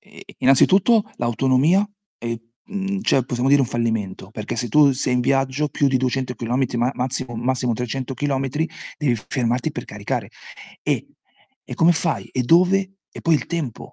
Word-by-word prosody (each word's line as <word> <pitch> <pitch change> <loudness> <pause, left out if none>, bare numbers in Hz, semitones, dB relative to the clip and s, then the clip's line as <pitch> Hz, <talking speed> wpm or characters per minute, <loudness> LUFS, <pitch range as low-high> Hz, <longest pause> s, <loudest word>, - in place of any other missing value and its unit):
Ehm, - - -16 0.2
innanzitutto 195 - +4
l'autonomia 135 - +2 0.3
e 115 -1 -4 0.2
mhmm, 195 0 -3
cioè 135 - +2
possiamo 125 +1 -1
dire 140 +1 +6
un 135 - +2
fallimento, 110 -5 -2
perché 110 +2 -5
se 120 +2 -2
tu 140 +4 +5
sei 130 -1 -1
in 125 - +2
viaggio 135 +3 +1
più 145 -1 +1
di 130 - +2
200 130 0 -1
chilometri 125 +2 -1
ma 120 +2 +2
massimo, 130 -1 -3
massimo 125 +1 0
300 125 +3 -3
chilometri 140 +3 -1 0.3
devi 145 -6 +2
fermarti 120 -1 0
per - - -5
caricare. - - -4 0.5
E - - -1 0.6
e - - -4
come 170 +1 +5
fai? 165 0 -1
E 130 - 0
dove? 185 +6 +4 0.2
E - - -10
poi 165 - +3
il 150 - +1
tempo, 160 -9 -4
130 Hz, 170 wpm, -22 LUFS, 120-150 Hz, 0.6 s, dire